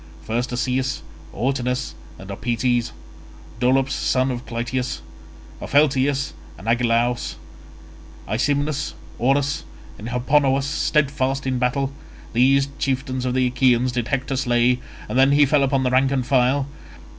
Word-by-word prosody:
First 120 +3 -2
Asaeus, 130 +2 -1 0.3
Autonous, 125 +1 -1 0.2
and 95 +1 -9
Opites; 120 +2 0 0.7
Dolops 130 +2 +2
son 130 0 +1
of 125 0 -6
Clytius, 120 - -3 0.6
Opheltius 140 -1 +2 0.2
and 95 +7 -11
Agelaus; 120 +1 +1 0.9
Aesymnus, 145 0 -1 0.2
Orus 140 +3 +1 0.4
and 110 +3 -6
Hipponous 135 +2 +2
steadfast 140 -2 0
in 130 -1 0
battle; 130 +2 0 0.4
these 135 +3 +4
chieftains 130 -1 -1
of 125 0 -1
the 130 -1 +3
Achaeans 125 0 +2
did 120 -2 -2
Hector 135 +1 -1
slay, 125 -1 +2 0.3
and 130 - 0
then 135 +1 +5
he 145 0 +6
fell 145 +1 +3
upon 135 -1 +2
the 125 - +1
rank 130 +1 +4
and 130 -2 0
file. 130 +1 +2
130 Hz, 125 wpm, -22 LUFS, 125-135 Hz, 0.9 s, he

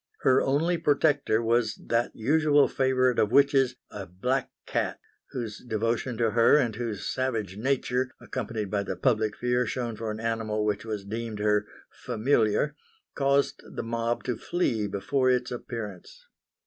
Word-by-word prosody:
Her 130 0 +4
only 165 +6 +1
protector 145 -6 +2
was 115 -1 +2
that 120 0 -1
usual 145 +4 +3
favourite 130 -2 +2
of 105 - +2
witches, 135 -1 +4 0.2
a 100 -2 -7
black 125 +10 -1 0.2
cat, - - -2 0.3
whose 115 -4 -5
devotion 115 +1 -2
to 115 -1 +2
her 115 +5 +5
and 120 -7 +1
whose 115 -3 -4
savage 115 -8 -2
nature, 130 +2 0
accompanied 110 -4 -4
by 100 -1 +1
the 100 - -4
public 110 -5 +1
fear 125 0 +1
shown 120 -2 -3
for 110 +1 -4
an 105 0 -4
animal 110 -2 -1
which 105 +1 -1
was 105 -3 -4
deemed 110 +1 -4
her 105 0 +1 0.2
"familiar," 115 +2 +1 0.4
caused 140 0 +1
the - - -6
mob 115 +1 -2
to 125 -3 -2
flee 115 -12 -1
before 130 +7 0
its 125 -1 +1
appearance. 115 -6 -7
115 Hz, 150 wpm, -27 LUFS, 110-130 Hz, 0.4 s, her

